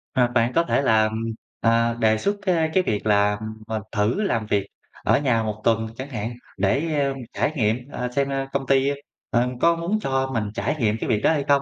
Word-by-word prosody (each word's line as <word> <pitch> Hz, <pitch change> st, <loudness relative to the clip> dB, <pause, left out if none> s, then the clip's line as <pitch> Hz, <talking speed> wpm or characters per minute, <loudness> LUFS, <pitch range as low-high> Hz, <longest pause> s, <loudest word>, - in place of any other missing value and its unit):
À, 125 Hz, -2 st, +4 dB
bạn 120 Hz, 0 st, +1 dB
có 170 Hz, -, +3 dB
thể 160 Hz, -, +1 dB
là, 110 Hz, -4 st, +3 dB, 0.5 s
à, 115 Hz, 0 st, +3 dB
đề 110 Hz, -1 st, +3 dB
xuất, 200 Hz, -, 0 dB
a, 175 Hz, -5 st, +2 dB
cái 185 Hz, -, +3 dB
việc 105 Hz, -, -2 dB
là, 105 Hz, -1 st, +3 dB, 0.3 s
ờ, 110 Hz, -1 st, -2 dB
thử 110 Hz, -, +1 dB
làm 115 Hz, -, 0 dB
việc 100 Hz, -2 st, 0 dB, 0.4 s
ở -, -, +3 dB
nhà 125 Hz, -6 st, +1 dB
1 110 Hz, 0 st, -4 dB
tuần 115 Hz, 0 st, +2 dB
chẳng 130 Hz, +2 st, -6 dB
hạn 115 Hz, -2 st, -4 dB, 0.2 s
để, 140 Hz, -, +1 dB, 0.2 s
a, 140 Hz, 0 st, 0 dB, 0.2 s
trải 145 Hz, -, 0 dB
nghiệm, 110 Hz, -4 st, +2 dB
à, 125 Hz, 0 st, -3 dB
xem 140 Hz, 0 st, +1 dB, 0.2 s
công 135 Hz, -1 st, -1 dB
ty, 135 Hz, 0 st, +3 dB, 0.4 s
a, 120 Hz, 0 st, +2 dB
có 170 Hz, 0 st, +5 dB
muốn 170 Hz, +6 st, -1 dB
cho 135 Hz, -7 st, -1 dB
mình 110 Hz, -3 st, 0 dB
trải 145 Hz, -, -1 dB
nghiệm 110 Hz, -3 st, +1 dB
cái -, -, -3 dB
việc 110 Hz, -3 st, +2 dB
đó -, -, +4 dB
hay 150 Hz, -3 st, +1 dB
không. 140 Hz, -1 st, +4 dB
120 Hz, 215 wpm, -23 LUFS, 110-140 Hz, 0.5 s, có